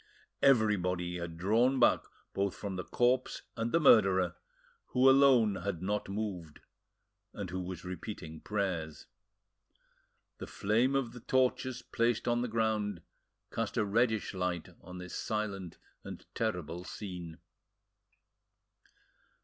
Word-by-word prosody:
Everybody 90 -8 +2
had 85 -1 -6
drawn 115 +9 +2
back 120 - +5 0.3
both 100 -1 -1
from 100 -2 -5
the 90 - -3
corpse 125 +1 +1
and 115 0 -2
the 170 - +4
murderer, 95 - +5 0.5
who 130 +1 +3
alone 130 -7 +6
had 90 -1 -4
not 100 +1 -2
moved, 100 -7 -4 0.7
and 100 -4 -5
who 95 - -3
was 90 -1 -6
repeating 90 -3 -7
prayers. 85 -8 -3 1.3
The - - -6
flame 115 +7 +1
of 130 -4 0
the 125 - -10
torches 130 0 0
placed 115 0 0
on 120 0 +2
the 125 - -1
ground 110 -5 -1 0.5
cast - - -3
a 105 - +2
reddish 110 +1 +1
light 90 -3 -2
on 90 +1 -10
this 90 0 -8
silent 100 -5 -3 0.3
and - - -9
terrible 90 -6 -2
scene. 90 -5 -7
100 Hz, 125 wpm, -32 LUFS, 90-115 Hz, 1.3 s, alone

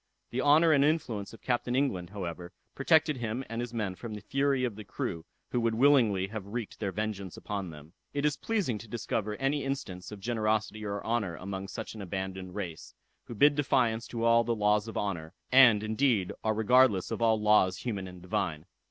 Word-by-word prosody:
The 125 - -1
honor 155 +4 +5
and 140 -2 +5
influence 125 -10 0
of 115 - -14
Captain 120 0 0
England, 100 -11 0
however, 90 -2 -6 0.2
protected 155 0 +3
him 120 +2 -3
and 115 +2 -4
his 120 -1 -5
men 110 -5 -2
from 110 +4 -7
the 105 - -8
fury 135 +3 +1
of 120 -5 -1
the 105 - -8
crew, 85 -3 -4 0.3
who 120 - +1
would 115 -1 +1
willingly 115 -7 +4
have 105 -2 -6
wreaked 115 +1 -5
their 100 -3 -2
vengeance 100 -3 -4
upon 100 -3 -4
them. 75 +1 -12 0.2
It 145 0 -1
is 150 -2 +2
pleasing 190 - -1
to 115 - -11
discover 105 -1 -3
any 135 +4 0
instance 110 -10 -4
of 105 - -8
generosity 110 -1 -1
or 100 -1 -3
honor 110 -7 -1
among 95 +1 -6
such 110 +2 -6
an 110 - -8
abandoned 95 -1 -5
race, 85 -6 -6 0.3
who 120 - -8
bid 145 +7 +6
defiance 125 -5 +1
to 115 -1 -4
all 115 0 +5
the 115 0 0
laws 105 0 +2
of 110 - -6
honor, 85 -6 -3 0.2
and, 125 -5 +7
indeed, 110 -3 +1
are 110 0 +1
regardless 110 -3 +4
of - - -3
all 110 -1 +3
laws 105 -3 +4
human 100 -6 -4
and 90 -1 -11
divine. 85 -4 -2
110 Hz, 200 wpm, -30 LUFS, 95-125 Hz, 0.3 s, and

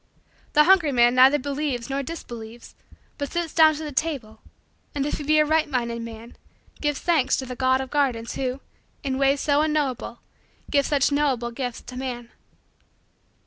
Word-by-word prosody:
The 300 - +6
hungry 345 -4 +4
man 240 -1 +4
neither 260 +3 +6
believes 280 -3 -3
nor 275 0 -2
disbelieves 240 -6 -9 0.5
but 285 -1 -3
sits 340 -2 -3
down 315 -1 +6
to 310 - -6
the 300 - -5
table 260 -7 -3 0.5
and, 280 -1 -1
if 295 - -2
he - - -5
be 305 +2 +3
a 305 - +5
right 315 0 +1
minded 235 -3 -2
man, 230 +1 -10 0.4
gives 295 -2 0
thanks 300 -7 +2
to 265 - -4
the 250 0 -6
God 260 0 +2
of 265 - -7
gardens 250 -6 0
who, 260 0 -3 0.4
in 265 -2 -2
ways 275 0 +2
so 290 0 +2
unknowable, 290 -6 -1 0.5
gives 280 -2 +2
such 285 -1 +2
knowable 270 -5 0
gifts 245 -1 -5
to 250 - -10
man. 245 -2 -5
275 Hz, 175 wpm, -24 LUFS, 245-295 Hz, 0.5 s, The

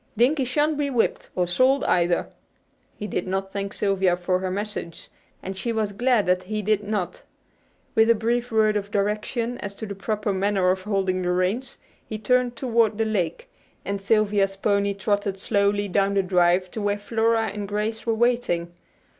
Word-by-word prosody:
"Dinkie 265 +4 +3
shan't 295 +3 +1
be 285 -1 0
whipped, 245 -4 0
or 180 - +2
sold 255 +10 +3
either." 175 0 +2 0.7
He 210 - -5
did 205 - -3
not 190 +1 -2
thank 200 0 -3
Sylvia 195 -4 +1
for 180 +1 0
her 185 0 -2
message, 200 -3 -5 0.3
and 190 +1 -5
she 230 +5 -3
was 220 -2 -1
glad 240 +1 +2
that 180 0 +2
he 210 +3 -4
did 210 0 +2
not. 205 -3 -3 0.7
With 220 +1 +4
a 230 - +6
brief 235 +2 -1
word 215 -1 +3
of 205 -1 -2
direction 210 +4 -1
as 200 -1 -6
to 220 - -6
the 200 - -5
proper 210 +1 -2
manner 190 -1 +2
of 190 0 -2
holding 190 -2 0
the 180 - -1
reins, 185 +8 -1 0.3
he 215 - -6
turned 245 +2 +1
toward 230 -4 +1
the 225 - +1
lake, 185 -7 -2 0.4
and 200 0 -3
Sylvia's 200 -1 +2
pony 200 0 +1
trotted 200 -1 -1
slowly 205 0 +1
down 200 +1 +1
the 195 - +3
drive 180 0 +2
to 220 - -5
where 205 0 0
Flora 225 +1 +1
and 205 -1 -5
Grace 210 +2 -2
were 230 -1 0
waiting. 220 -8 0
205 Hz, 180 wpm, -24 LUFS, 190-225 Hz, 0.7 s, a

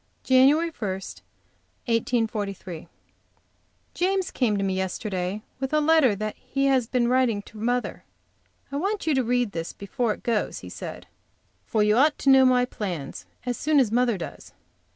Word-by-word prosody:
JAN. 260 0 +6
1, 290 - +5
1842. 215 - -4 1.1
James 375 +1 0
came 225 -6 +1
to 195 - -1
me 190 -1 0
yesterday 190 +1 -3 0.2
with 265 0 -3
a 305 - +4
letter 300 -8 +4 0.2
he 275 +2 -2
had 260 -4 +2
been 245 -2 +1
writing 245 -5 +2
to 215 - -13
mother. 245 +3 -1 0.7
"I 280 - -2
want 395 +6 -2
you 315 - +2
to 265 -2 +2
read 245 -2 +1
this 165 -2 -5
before 220 +2 -2
it - - -21
goes," 230 -3 -1
he - - -9
said, - - -8 0.6
"for 215 -3 +2
you 210 +1 +3
ought 295 +3 +4
to 275 - +3
know 265 0 +7
my 250 -1 +4
plans 180 - -6 0.2
as 245 -1 -2
soon 305 -1 +2
as 240 -6 +2
mother 240 -2 +2
does." 170 - -9
245 Hz, 160 wpm, -25 LUFS, 205-270 Hz, 1.1 s, know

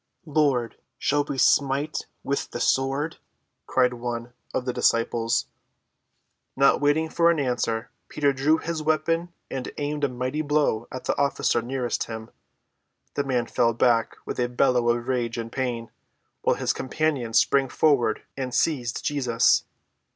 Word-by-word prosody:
"Lord, 140 -7 +1 0.2
shall 145 0 +1
we 140 - -4
smite 140 +3 +2 0.2
with 140 - -2
the - - -5
sword?" 135 +4 0 0.5
cried 125 -1 +2
one 120 0 -5 0.2
of 125 - -2
the 125 - -1
disciples. 115 0 +1 1.1
Not 135 +1 +4
waiting 145 +2 +2
for 170 +1 +3
an 170 -2 +2
answer, 120 -4 -1 0.2
Peter 145 -2 +1
drew 145 +4 +3
his 165 -1 -4
weapon 165 +3 0 0.2
and 130 -1 -4
aimed 145 0 -3
a 140 - +3
mighty 130 +4 -2
blow 145 -7 +1
at 130 - -6
the - - 0
officer 140 -4 +1
nearest 125 0 -2
him. 110 -1 -8 0.8
The 140 - 0
man 125 -3 0
fell 115 0 +1
back 120 -1 +2
with - - -5
a 120 0 +1
bellow 125 -1 +2
of 120 +1 0
rage 120 -3 -1
and 115 0 -5
pain, 120 -3 -3 0.5
while - - +2
his - - 0
companions 135 -5 -1
sprang 135 -1 +3
forward 145 -4 +2
and 130 -2 -4
seized 125 -8 0
Jesus. 125 -6 +2
130 Hz, 150 wpm, -25 LUFS, 120-145 Hz, 1.1 s, Not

